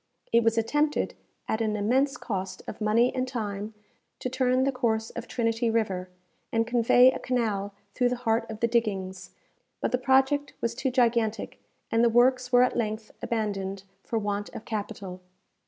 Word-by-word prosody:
It 235 Hz, 0 st, +5 dB
was 225 Hz, 0 st, +2 dB
attempted, 295 Hz, +7 st, +1 dB, 0.3 s
at 220 Hz, -, -1 dB
an 215 Hz, -1 st, 0 dB
immense 260 Hz, +7 st, +1 dB
cost 190 Hz, -3 st, -4 dB
of -, -, -7 dB
money 230 Hz, +4 st, +3 dB
and 255 Hz, 0 st, -1 dB
time, 210 Hz, -3 st, -4 dB, 0.4 s
to 255 Hz, -, -3 dB
turn 255 Hz, 0 st, +2 dB
the 275 Hz, -, +2 dB
course 225 Hz, -4 st, -1 dB
of 235 Hz, 0 st, -7 dB
Trinity 230 Hz, -1 st, 0 dB
river, 195 Hz, -5 st, -1 dB, 0.4 s
and 225 Hz, 0 st, +2 dB
convey 245 Hz, +2 st, +5 dB
a -, -, -5 dB
canal 210 Hz, -5 st, -1 dB, 0.2 s
through 245 Hz, -1 st, +2 dB
the 250 Hz, -, 0 dB
heart 230 Hz, -2 st, 0 dB
of 220 Hz, -1 st, -7 dB
the 235 Hz, -, +3 dB
diggings; 190 Hz, -5 st, -1 dB, 0.5 s
but -, -, -1 dB
the 250 Hz, -, +1 dB
project 270 Hz, +2 st, +2 dB
was 235 Hz, 0 st, -1 dB
too 265 Hz, +2 st, -1 dB
gigantic, 235 Hz, -3 st, +1 dB, 0.3 s
and 230 Hz, +1 st, +3 dB
the 235 Hz, -, +5 dB
works 250 Hz, +2 st, +3 dB
were 245 Hz, 0 st, +6 dB
at 250 Hz, -, +1 dB
length 215 Hz, -1 st, -2 dB
abandoned 195 Hz, -4 st, -2 dB, 0.2 s
for 230 Hz, -, -3 dB
want 205 Hz, -1 st, -2 dB
of -, -, -7 dB
capital. 200 Hz, -4 st, -5 dB
230 Hz, 170 wpm, -27 LUFS, 210-250 Hz, 0.5 s, were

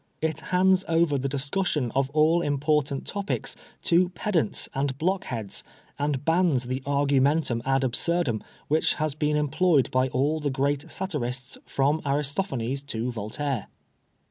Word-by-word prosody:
It 160 Hz, -1 st, -1 dB
hands 185 Hz, +1 st, +4 dB
over 165 Hz, -2 st, +2 dB
the 135 Hz, 0 st, -1 dB
discussion 145 Hz, -1 st, 0 dB
of 135 Hz, 0 st, +1 dB
all 155 Hz, +3 st, +3 dB
important 145 Hz, -1 st, 0 dB
topics 200 Hz, 0 st, -2 dB, 0.3 s
to 175 Hz, +1 st, +4 dB
pedants 175 Hz, -, -1 dB
and 135 Hz, -1 st, -1 dB
block 185 Hz, +5 st, 0 dB
heads, 110 Hz, -5 st, -4 dB, 0.4 s
and 145 Hz, -1 st, -1 dB
bans 165 Hz, -6 st, +3 dB
the 130 Hz, +2 st, -3 dB
argumentum 140 Hz, -2 st, +2 dB
ad 135 Hz, 0 st, +2 dB
abswrdum 130 Hz, -2 st, 0 dB, 0.3 s
which 155 Hz, +2 st, +2 dB
has 155 Hz, -2 st, -1 dB
been 150 Hz, 0 st, 0 dB
employed 150 Hz, -1 st, +2 dB
by 130 Hz, 0 st, +2 dB
all 140 Hz, +5 st, 0 dB
the 150 Hz, -1 st, -1 dB
great 140 Hz, +1 st, -1 dB
satirists 130 Hz, -9 st, -3 dB
from 145 Hz, +3 st, +1 dB
Aris 145 Hz, 0 st, 0 dB
tophanes 135 Hz, -7 st, -2 dB
to 120 Hz, -1 st, -2 dB
Voltaire. 120 Hz, +3 st, -3 dB
145 Hz, 145 wpm, -26 LUFS, 135-160 Hz, 0.4 s, hands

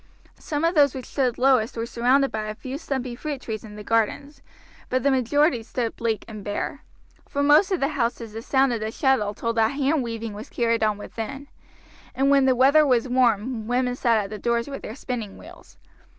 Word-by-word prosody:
Some 295 Hz, +1 st, -2 dB
of 335 Hz, -, +2 dB
those 285 Hz, -5 st, +4 dB
which 260 Hz, -, -6 dB
stood 255 Hz, -4 st, -1 dB
lowest 255 Hz, -3 st, +2 dB
were 230 Hz, -, -2 dB
surrounded 255 Hz, +4 st, +2 dB
by 215 Hz, -1 st, -3 dB
a 215 Hz, 0 st, -5 dB
few 265 Hz, +5 st, -6 dB
stumpy 260 Hz, -6 st, -3 dB
fruit 290 Hz, +2 st, -5 dB
trees 220 Hz, -4 st, -6 dB
in 210 Hz, -2 st, -10 dB
the 210 Hz, -, -8 dB
gardens, 275 Hz, +7 st, -1 dB, 0.5 s
but 255 Hz, -1 st, 0 dB
the 280 Hz, -, +3 dB
majority 265 Hz, +1 st, +2 dB
stood 230 Hz, 0 st, -3 dB
bleak 225 Hz, -3 st, -2 dB
and 215 Hz, -2 st, -8 dB
bare. 205 Hz, +8 st, -4 dB, 0.5 s
From 285 Hz, 0 st, 0 dB
most 300 Hz, +7 st, +5 dB
of 370 Hz, -, +1 dB
the 275 Hz, -, +1 dB
houses 235 Hz, -5 st, -2 dB
the 225 Hz, -, -6 dB
sound 265 Hz, +1 st, +2 dB
of 230 Hz, -, -2 dB
the 215 Hz, 0 st, -3 dB
shuttle 220 Hz, -4 st, +1 dB
told 230 Hz, +2 st, -3 dB
that 225 Hz, +3 st, +3 dB
hand 285 Hz, +1 st, +1 dB
weaving 230 Hz, -2 st, -5 dB
was 210 Hz, +2 st, -9 dB
carried 230 Hz, -1 st, 0 dB
on 215 Hz, -1 st, +1 dB
within, 235 Hz, +7 st, -7 dB, 0.7 s
and 275 Hz, +1 st, +2 dB
when 275 Hz, -1 st, +5 dB
the 260 Hz, -1 st, +4 dB
weather 275 Hz, +5 st, +5 dB
was 255 Hz, -3 st, +2 dB
warm 240 Hz, -2 st, +1 dB
women 250 Hz, +1 st, 0 dB
sat 235 Hz, -3 st, +2 dB
at 205 Hz, -1 st, -2 dB
the 215 Hz, -, -6 dB
doors 235 Hz, +2 st, 0 dB
with 275 Hz, -1 st, -6 dB
their 220 Hz, -, -7 dB
spinning 235 Hz, -7 st, -5 dB
wheels. -, -, -15 dB
245 Hz, 210 wpm, -24 LUFS, 225-275 Hz, 0.7 s, most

